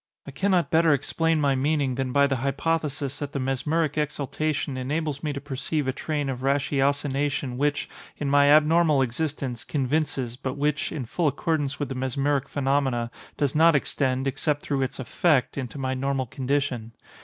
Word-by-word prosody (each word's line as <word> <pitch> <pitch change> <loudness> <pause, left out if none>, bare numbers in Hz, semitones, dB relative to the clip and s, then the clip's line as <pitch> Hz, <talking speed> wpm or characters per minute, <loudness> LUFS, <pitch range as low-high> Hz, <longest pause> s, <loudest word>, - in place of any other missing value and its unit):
I 140 - -8
cannot 180 +4 +1
better 160 -1 +5
explain 165 +3 0
my 140 -2 +3
meaning 140 0 +1
than 130 0 -2
by 140 +2 +4
the 135 -2 0
hypothesis 140 +1 -1
that 145 -1 -5
the 140 - -1
mesmeric 150 +4 0
exaltation 150 -1 -2
enables 145 +2 -2
me 150 - -2
to 140 - -4
perceive 145 +1 -3
a 130 - 0
train 145 0 -2
of 130 -2 -3
ratiocination 140 0 0
which, 145 +2 0 0.3
in 145 - -3
my 140 0 +5
abnormal 155 -1 +5
existence, 130 -2 -3
convinces, 135 -3 -1
but 130 0 -4
which, 150 +1 0
in 135 -5 -4
full 165 +8 0
accordance 145 0 -1
with 145 - -2
the - - -3
mesmeric 135 +2 -1
phenomena, 135 -4 0 0.3
does 145 -3 +1
not 165 +1 +5
extend, 130 -1 0
except 145 +2 -1
through 140 -2 -1
its 130 - -2
effect, 135 +2 +1
into 130 0 -5
my 130 -1 -1
normal 135 0 -1
condition. 125 -2 -2
140 Hz, 165 wpm, -25 LUFS, 130-150 Hz, 0.3 s, better